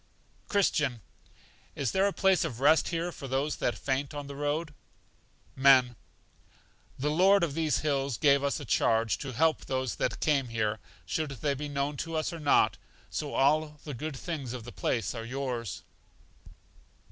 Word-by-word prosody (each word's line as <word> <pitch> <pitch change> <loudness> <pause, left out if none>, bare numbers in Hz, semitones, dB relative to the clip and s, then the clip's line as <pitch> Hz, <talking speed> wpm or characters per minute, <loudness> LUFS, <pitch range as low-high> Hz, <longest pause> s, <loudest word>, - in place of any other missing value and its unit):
Christian. 150 - +1 0.7
Is 135 -4 -1
there 195 +1 +3
a - - 0
place 190 -1 +3
of 130 -8 -4
rest 150 +4 +4
here 170 +1 -2
for 140 - -8
those 135 +3 -1
that 120 - -1
faint 140 +1 -2
on 145 -1 -5
the 140 0 -8
road? 145 +2 -2 0.8
Men. 130 -2 +5 1.0
The 150 +3 -1
Lord 190 +4 +5
of 160 -5 0
these 160 -1 0
Hills 140 -5 0
gave 140 -1 +4
us 140 +3 0
a 145 - -7
charge 115 -1 +2
to 135 - -5
help 160 +5 +2
those 130 -8 -2
that - - -1
came 140 -4 +1
here, 110 -2 -1 0.3
should 155 -2 -2
they 140 +2 -1
be 145 +2 -5
known 145 0 -2
to 165 +2 -4
us 155 +2 -1
or 165 - -6
not; 145 -2 +3 0.3
so - - -3
all 150 +2 +2
the 150 - -6
good 145 +3 -5
things 140 -6 -5
of 125 -3 -6
the 120 - -9
place 115 -4 -1
are 115 -2 -5
yours. 125 -3 -4
140 Hz, 170 wpm, -29 LUFS, 130-155 Hz, 1.0 s, Men